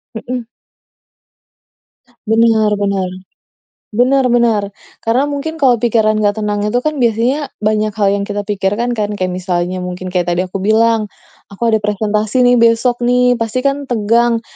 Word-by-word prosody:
Heeh. 245 +2 -4 1.8
Benar 220 -1 +3
benar. 195 -2 -1 0.8
Benar 260 +4 +3
benar. 230 -4 +2 0.4
Karena 230 +4 +1
mungkin 290 +3 -4
kalau 255 -6 +3
pikiran 215 -2 +2
gak 210 0 0
tenang 205 0 -1
itu 245 +4 0
kan 305 0 -2
biasanya 245 +5 +1 0.2
banyak 215 0 0
hal 205 -2 +1
yang 200 - -2
kita 205 0 -3
pikirkan, 205 +4 -1
kan? 210 0 -1
Kayak 185 -2 -2
misalnya 180 0 -2
mungkin 180 0 -5
kayak 180 -1 -1
tadi 180 - 0
aku 185 +1 -5
bilang, 220 +2 +2 0.4
"Aku 200 +3 -14
ada 220 - +3
presentasi 210 +3 0
nih 245 0 +4
besok 230 +1 +3
nih." 250 0 +3
Pasti 230 +2 -2
kan 280 0 -1
tegang, 235 0 +1
220 Hz, 150 wpm, -15 LUFS, 205-245 Hz, 1.8 s, nih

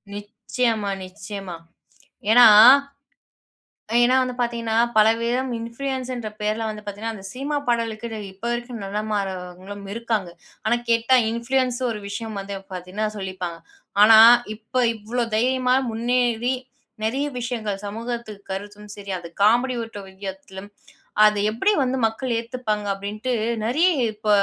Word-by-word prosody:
நிச்சயமா! 210 0 -2
நிச்சயமா! 190 -1 -8 0.8
ஏன்னா 245 0 +9 1.6
ஏன்னா 250 +2 +4
வந்து 250 -1 -3
பார்த்தீங்கன்னா, 230 -2 -1 0.2
பலவிதம் 235 +4 +2
இன்ஃப்ளூயன்ஸ்ன்ற 250 0 -4
பேர்ல 215 +2 -1
வந்து 210 0 -8
பார்த்தீங்கன்னா, 210 +2 -5
அந்த 195 - -12
சினிமா 280 +3 -3
பாடலுக்கு, 230 -1 -1 0.3
இப்ப 190 - -26
வரைக்கும் 240 -1 -5
நிலமாறவங்களும் 195 -1 -4
இருக்காங்க. 225 -6 -2 0.3
ஆனா 240 - +2
கேட்டா 230 +3 +4
இன்ஃப்ளூயன்ஸ் 250 +1 0
ஒரு 215 - -4
விஷயம் 215 0 -5
வந்து 200 +1 -6 0.2
பார்த்தீங்கன்னா 185 +4 -3
சொல்லிப்பாங்க, 185 -3 -5 0.4
ஆனா 220 +1 +9 0.4
இப்ப 230 +4 -2
இவ்ளோ 230 +3 -2
தைரியமா, 255 +2 +2 0.2
முன்னேறி, 240 +1 0 0.5
நிறைய 270 +6 0
விஷயங்கள் 225 -5 -3
சமூகத்துக்கு 225 -1 -6
கருத்தும் 205 +1 -7
சரி, 200 -1 -7
அது 170 -1 -10
காமெடி 245 +4 +3
ஒட்டு 205 -3 -9 0.2
வியத்துலயும். 190 +1 -8 0.6
அத 210 0 +3 0.2
எப்படி 390 - +2
வந்து 260 +1 -1
மக்கள் 235 +2 -2
ஏத்துப்பாங்க 230 -3 -3
அப்படின்ட்டு, 210 +5 -4 0.3
நிறைய 315 +10 +3 0.3
இப்ப 215 0 -7
225 Hz, 120 wpm, -23 LUFS, 205-245 Hz, 1.6 s, ஏன்னா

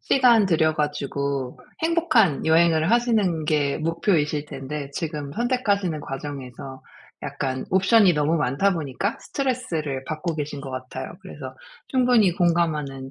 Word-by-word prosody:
시간 240 -6 +4
들여 160 -3 +2
가지고 140 -3 -2 0.2
행복한 320 - +2
여행을 160 +1 +4
하시는 220 -9 +2
게 150 -2 +1
목표이실 155 -2 0
텐데 140 +1 -6
지금 150 -2 -4
선택하시는 205 - 0
과정에서 135 -2 -7 0.4
약간 130 -1 -3
옵션이 195 +1 +5
너무 150 +2 +1
많다 150 +7 +1
보니까 170 - -3
스트레스를 165 - -3
받고 155 +3 -3
계신 145 -1 -4
것 135 -1 -7
같아요. 130 0 -6
그래서 130 -3 -9 0.3
충분히 245 -7 +3
공감하는 155 -7 0
155 Hz, 315 characters per minute, -24 LUFS, 140-195 Hz, 0.4 s, 옵션이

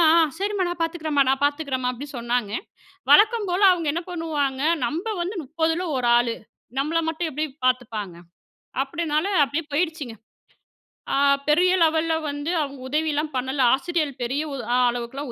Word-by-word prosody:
அ, - - +6 0.2
சரிம்மா 400 -2 0
நான் 350 -1 -5
பாத்துக்கிறேன்ம்மா, 310 -4 0
நான் 270 +1 -1
பாத்துக்கிறேன்ம்மா 280 -4 -1
அப்டின்னு 275 +2 -8
சொன்னாங்க. 235 -3 -1 0.6
வழக்கம் 440 -1 +5
போல 370 +3 0
அவுங்க 335 -4 -1
என்ன 340 +1 -3
பண்ணுவாங்க, 290 -6 -2 0.3
நம்ப 335 - -4
வந்து 375 +4 -3
30ல 325 +4 -1
ஒரு 240 -1 +1
ஆளு. 240 -1 +1 0.4
நம்மள 320 +4 +1
மட்டும் 320 0 -2
எப்டி 305 +3 -1 0.2
பாத்துப்பாங்க, 220 -8 -2 0.7
அப்டினால 310 +3 -1 0.2
அப்டியே 305 +4 -3
போயிருச்சுங்க. 315 -8 -2 1.0
ஆ - - +2 0.3
பெரிய 355 +5 +4
லெவல்ல 320 0 +3
வந்து 290 +3 -3
அவுங்க 280 -2 -5
உதவிலாம் 300 +1 0
பண்ணல. 265 +2 -1
ஆசிரியர்கள் 315 0 -1
பெரிய 265 +5 -1
உ - - -3 0.4
அளவுக்கெல்லாம் 245 +3 -5
300 Hz, 140 wpm, -24 LUFS, 265-330 Hz, 1.0 s, அ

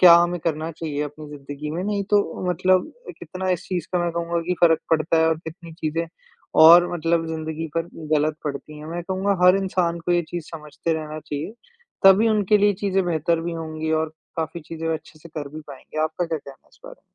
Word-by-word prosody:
क्या 175 -2 +10
हमें 175 +1 +3
करना 160 0 -2
चाहिए 150 -2 -3
अपनी 150 +1 -9
ज़िंदगी 145 +1 -7
में, 170 +4 -3
नहीं 205 -1 -1
तो, 200 -3 +1
मतलब 185 - +2 0.3
कितना 185 0 -5
इस 180 -1 -1
चीज़ 180 -3 -2
का 180 - +2
मैं 170 - 0
कहूँगा 170 0 -1
कि 180 - +1
फ़र्क 165 -2 +5
पड़ता 160 0 +2
है, 160 0 +4
और 160 -1 +1
कितनी 165 0 -10
चीज़ें 165 0 -2 0.5
और 170 +2 +9
मतलब 165 0 0
ज़िंदगी 160 0 -4
पर 165 0 -1 0.3
गलत 155 +1 +1
पड़ती 150 +1 -5
हैं। 150 - -9
मैं 175 +1 -4
कहूँगा 190 +2 0
हर 180 +1 +7
इंसान 180 -3 0
को 175 - +3
ये 175 0 +3
चीज़ 175 -2 -4
समझते 155 0 -4
रहना 155 -1 -5
चाहिए, 150 +6 -5 0.5
तभी 195 +4 +7
उनके 210 -1 +3
लिए 205 0 +4
चीज़ें 195 -1 +1
बेहतर 165 0 +1
भी 170 +1 -3
होंगी, 160 -1 -4
और 160 0 0 0.2
काफ़ी 160 +1 -3
चीज़ें 165 +1 -5
वो 160 - +1
अच्छे 155 0 -10
से 170 - -12
कर 150 -2 -5
भी 155 - -6
पाएँगे। 145 +2 -5
आपका 160 +3 -2
क्या 160 -1 -2
कहना 140 -2 -14
है - - -29
इस - - -24
बारे? - - -12
165 Hz, 215 wpm, -23 LUFS, 155-180 Hz, 0.5 s, क्या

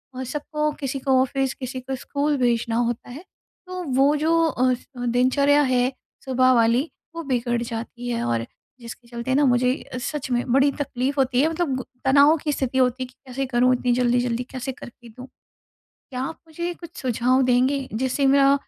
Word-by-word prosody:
और 260 - -4
सबको 300 +2 -2
किसी 275 0 -2
को 260 -1 +3
ऑफिस 265 0 0
किसी 255 0 -6
को 265 +1 -5
स्कूल 285 +2 -1
भेजना 235 -2 +1
होता 240 0 -1
है, 285 +8 -9 0.4
तो 365 -1 -5
वो 275 +1 +3
जो 325 +3 +2
अफ़ 255 -4 0 0.2
दिनचर्या 280 +4 +3
है 255 -1 +2 0.3
सुबह 255 0 +3
वाली, 235 +6 +3 0.3
वो 335 - -4
बिगड़ 240 -3 -1
जाती 235 +1 -6
है 235 -1 -1
और 115 -1 -1 0.4
जिसके 235 +1 -10
चलते 240 +2 -3
ना 290 - +4
मुझे 250 0 +3 0.2
अ, - - -3
सच 270 +1 -4
में 240 0 0
बड़ी 275 +1 +4
तकलीफ़ 275 0 -2
होती 260 -1 +2
है। 315 - +3
मतलब 320 -5 -1
गु 260 - -4 0.2
तनाव 285 +4 +6
की 295 0 -2
स्थिति 265 -2 -2
होती 255 0 +2
है - - -6
कि 255 - -21
कैसे 270 +2 -3
करूँ 250 0 +3
इतनी 245 0 0
जल्दी-जल्दी 245 0 +1
कैसे 265 +1 -4
करके 240 -1 -13
दूँ। 250 +3 -11 0.7
क्या 255 -2 -8
आप 325 +4 -5
मुझे 345 +2 -4
कुछ 340 -1 -11
सुझाव 255 +1 +2
देंगे? 255 +2 +2
जिससे 260 +4 0
मेरा 275 0 +5
255 Hz, 185 wpm, -23 LUFS, 245-280 Hz, 0.7 s, तनाव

